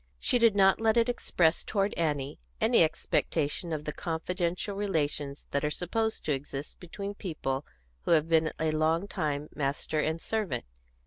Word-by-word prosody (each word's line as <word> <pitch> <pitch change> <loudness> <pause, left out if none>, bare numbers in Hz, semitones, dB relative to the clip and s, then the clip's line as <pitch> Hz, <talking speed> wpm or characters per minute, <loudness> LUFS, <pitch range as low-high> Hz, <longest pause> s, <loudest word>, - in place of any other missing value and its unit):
She 245 - +2
did 230 -3 +5
not 195 +1 +5
let 225 0 +3
it 235 +1 +4
express 170 -8 +2
toward 200 -1 0
Annie 145 -4 -1 0.2
any - - +4
expectation 160 +2 0
of 150 -1 -3
the 150 - -3
confidential 175 +3 -2
relations 150 -8 -1
that 140 - 0
are 150 - +2
supposed 220 +8 -1
to 155 - 0
exist 135 +1 -6
between 200 +3 -6
people 150 -8 -3 0.4
who - - -3
have 155 -1 +4
been 160 -1 +3
a 160 0 +1
long 160 +4 +1
time 150 -5 -2
master 145 +2 -1
and 160 +2 0
servant. 200 - -2
160 Hz, 165 wpm, -29 LUFS, 150-195 Hz, 0.4 s, did